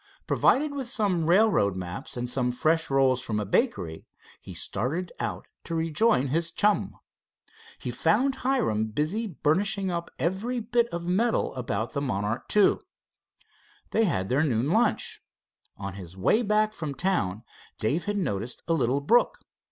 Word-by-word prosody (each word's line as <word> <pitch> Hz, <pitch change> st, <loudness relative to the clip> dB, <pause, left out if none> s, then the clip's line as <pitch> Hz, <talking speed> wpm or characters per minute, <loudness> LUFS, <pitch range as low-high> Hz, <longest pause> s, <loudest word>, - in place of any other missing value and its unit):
Provided 290 Hz, +2 st, +2 dB
with 275 Hz, -3 st, -4 dB
some 195 Hz, -9 st, 0 dB
railroad 175 Hz, -, +4 dB
maps, 90 Hz, +5 st, -4 dB
and 120 Hz, 0 st, -2 dB
some 125 Hz, 0 st, 0 dB
fresh 160 Hz, +6 st, +1 dB
rolls 135 Hz, -2 st, +3 dB
from 110 Hz, -5 st, -2 dB
a 105 Hz, -, -2 dB
bakery, 95 Hz, -, -1 dB, 0.3 s
he -, -, -10 dB
started 165 Hz, +9 st, -2 dB
out 105 Hz, -6 st, -3 dB, 0.2 s
to 165 Hz, -, -4 dB
rejoin 160 Hz, -, +2 dB
his 165 Hz, +4 st, +1 dB
chum. 205 Hz, +4 st, +1 dB, 0.8 s
He -, -, -5 dB
found 270 Hz, +1 st, +2 dB
Hiram 235 Hz, -, 0 dB
busy 155 Hz, -, -1 dB
burnishing 190 Hz, +4 st, 0 dB
up 170 Hz, -1 st, -3 dB
every 195 Hz, -, -1 dB
bit 235 Hz, +1 st, +1 dB
of 170 Hz, -6 st, -5 dB
metal 215 Hz, +6 st, +1 dB
about 120 Hz, -3 st, -3 dB
the 140 Hz, -, -1 dB
Monarch 105 Hz, -4 st, -2 dB
II. 205 Hz, -, +5 dB, 1.1 s
They 225 Hz, -, +3 dB
had 95 Hz, -, 0 dB
their 130 Hz, +6 st, +2 dB
noon 130 Hz, -3 st, +1 dB
lunch. 225 Hz, +2 st, +1 dB, 0.6 s
On 100 Hz, -1 st, -5 dB
his 95 Hz, -2 st, -10 dB
way 215 Hz, -, +3 dB
back 215 Hz, -1 st, +2 dB
from 155 Hz, -8 st, -5 dB
town 110 Hz, -, -1 dB, 0.3 s
Dave' 140 Hz, +11 st, 0 dB
had 205 Hz, 0 st, -1 dB
noticed 120 Hz, -, -3 dB
a 165 Hz, -, +2 dB
little 135 Hz, -2 st, +1 dB
brook. 235 Hz, +12 st, +3 dB
160 Hz, 150 wpm, -27 LUFS, -, 1.1 s, II